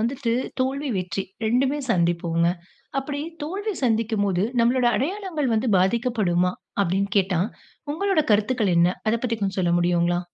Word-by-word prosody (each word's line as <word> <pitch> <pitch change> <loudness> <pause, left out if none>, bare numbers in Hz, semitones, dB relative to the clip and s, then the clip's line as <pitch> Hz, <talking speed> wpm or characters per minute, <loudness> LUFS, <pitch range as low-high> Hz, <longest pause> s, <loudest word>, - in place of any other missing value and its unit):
வந்துட்டு 240 +1 -1 0.3
தோல்வி, 275 +3 -1
வெற்றி 185 +1 -3 0.2
2மே 260 +6 +2
சந்திப்போங்க. 170 -3 +1 0.5
அப்பிடி 285 +1 -3 0.2
தோல்வி 405 +7 -3
சந்திக்கும்போது, 215 -5 +1 0.2
நம்மளோட 245 +1 +3
அடையாளங்கள் 320 - -1
வந்து 225 +2 0
பாதிக்கப்படுமா? 190 -4 +1 0.3
அப்பிடின்னு 195 +1 0
கேட்டா, 185 -3 +1 0.5
உங்களோட 385 0 +1
கருத்துக்கள் 210 -2 +2
என்ன? 170 - +5 0.2
அத 220 - +3
பத்தி 230 -2 0
கொஞ்சம் 195 -1 -2
சொல்ல 175 -1 +1
முடியுங்களா? 175 0 +2
220 Hz, 130 wpm, -24 LUFS, 180-265 Hz, 0.5 s, என்ன